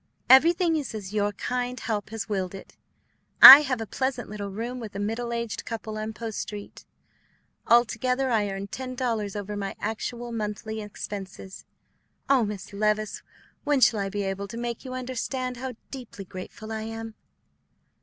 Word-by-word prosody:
"Everything 335 +5 +6
is 280 -7 -4
as 205 -2 -7
your 205 -1 +1
kind 250 +3 -3
help 215 -3 -3
has 225 -1 -5
willed 195 -3 -2
it. 190 - -12 0.6
I 275 +3 +14
have 265 -5 -2
a 225 - -3
pleasant 260 +2 -3
little 205 -1 -5
room 235 +5 -5
with 215 -4 -8
a - - -3
middle 225 +3 -2
aged 235 -2 -3
couple 220 -1 -6
on 215 0 -4
Post 220 -1 -6
Street. 205 -1 -7 0.8
Altogether 250 +2 +2
I 210 -3 +1
earn 195 0 -4
ten 255 +5 -6
dollars 225 -6 -2
over 205 0 -4
my 200 -1 -4
actual 235 +3 -4
monthly 220 0 -4
expenses. 195 -2 -8 0.6
Oh, 270 -3 +4
Miss 205 -1 -6
Levice, 210 +1 0 0.4
when 290 -2 +2
shall 230 -3 +4
I 195 -1 -2
be 205 +1 -3
able 195 +1 -3
to 230 - -8
make 235 -1 -4
you 255 -1 -6
understand 255 0 -3
how 260 +1 -5 0.2
deeply 240 -7 -8
grateful 195 +4 -9
I 220 0 -3
am?" 225 0 -6
220 Hz, 165 wpm, -26 LUFS, 205-250 Hz, 0.8 s, I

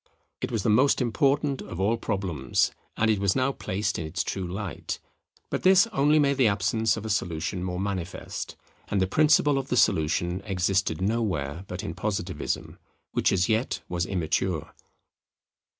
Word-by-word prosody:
It 125 - -2
was 110 -4 -1
the - - +2
most 130 +6 +4
important 140 +2 +1
of 85 - -7
all 100 +4 +2
problems, 95 - 0 0.3
and 110 0 +3
it 105 - +1
was 100 -1 +2
now 130 +1 +2
placed 100 -3 -2
in 80 - -3
its 80 +4 -2
true 95 -2 -3
light. 95 -4 -4 0.5
But - - -1
this 190 +2 +6
only 145 +3 +4
made 140 -2 +3
the 130 -4 +5
absence 105 +2 +1
of 110 - -6
a - - -3
solution 90 -1 -2
more 90 -1 -3
manifest; 95 -3 -4 0.3
and 100 - 0
the 95 - +3
principle 145 +5 +4
of 135 - -5
the 125 - 0
solution 85 +1 +2
existed 95 -3 0
nowhere 95 -7 -1
but - - -5
in - - -4
Positivism, - - -3 0.3
which - - +2
as 90 -1 +2
yet 110 +3 0
was 90 +1 -2
immature. 90 -2 -1
100 Hz, 165 wpm, -26 LUFS, 90-125 Hz, 0.5 s, this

